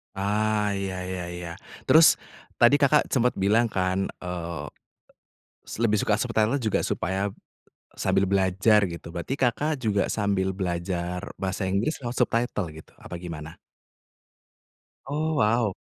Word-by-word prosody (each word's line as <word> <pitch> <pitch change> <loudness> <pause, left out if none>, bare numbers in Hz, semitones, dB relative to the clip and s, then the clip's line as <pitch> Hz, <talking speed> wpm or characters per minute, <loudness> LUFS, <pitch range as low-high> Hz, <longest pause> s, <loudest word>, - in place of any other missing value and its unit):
Ah, 105 +1 +1
iya 100 -1 -3
iya 90 -1 -4
iya. 90 -1 -6 0.3
Terus 160 0 +7 0.4
tadi, 120 +5 +5
Kakak, 145 +1 +3
sempet 125 -1 +2
bilang 110 +5 +3
kan, 95 -1 0 0.2
eee, 85 -3 -4 1.2
lebih 105 -2 +3
suka 105 - +1
subtitle 115 +3 +1
juga 110 -3 0
supaya 95 +2 -1 0.6
sambil 95 -1 +1
belajar 100 +2 +3
gitu, 85 -2 -7
berarti, 85 +9 -4
Kakak, 135 +3 0
juga 100 -4 +1
sambil 100 -2 0
belajar 90 0 -3 0.2
bahasa 95 +1 -2
Inggris 100 +11 0
lewat 120 0 -3
subtitle 115 -6 0
gitu, 80 +1 -13
apa - - -8
gimana? 80 -2 -8 1.5
Oh, 155 +3 -1
wow! 110 -4 +2
100 Hz, 125 wpm, -26 LUFS, 90-115 Hz, 1.5 s, Terus